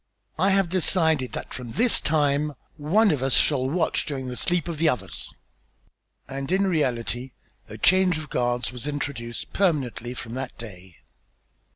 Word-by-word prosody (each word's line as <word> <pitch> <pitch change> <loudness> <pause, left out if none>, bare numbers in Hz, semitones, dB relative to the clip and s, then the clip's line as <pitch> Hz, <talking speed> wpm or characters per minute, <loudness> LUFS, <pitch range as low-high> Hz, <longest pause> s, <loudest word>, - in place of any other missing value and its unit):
I 190 +3 +4
have 195 -1 +3
decided 160 -6 +2
that - - -6
from 120 -3 -7
this 240 - +4
time 150 -1 +1 0.2
one 185 +8 +3
of 145 - -1
us 135 -1 +2
shall 130 -3 +3
watch 165 +3 0
during 135 -4 -4
the 125 - -5
sleep 175 +3 0
of 165 -3 -4
the 165 -1 +4
others." 125 - -4 1.0
And 135 +2 -5
in 195 +1 +3
reality 125 -6 -1 0.4
a - - -8
change 185 -2 +4
of 155 -2 -8
guards 120 0 0
was 125 +2 -7
introduced 135 -5 -4
permanently 135 - 0
from 115 -1 -7
that 130 0 -5
day. 95 -6 -10
145 Hz, 160 wpm, -25 LUFS, 125-170 Hz, 1.0 s, I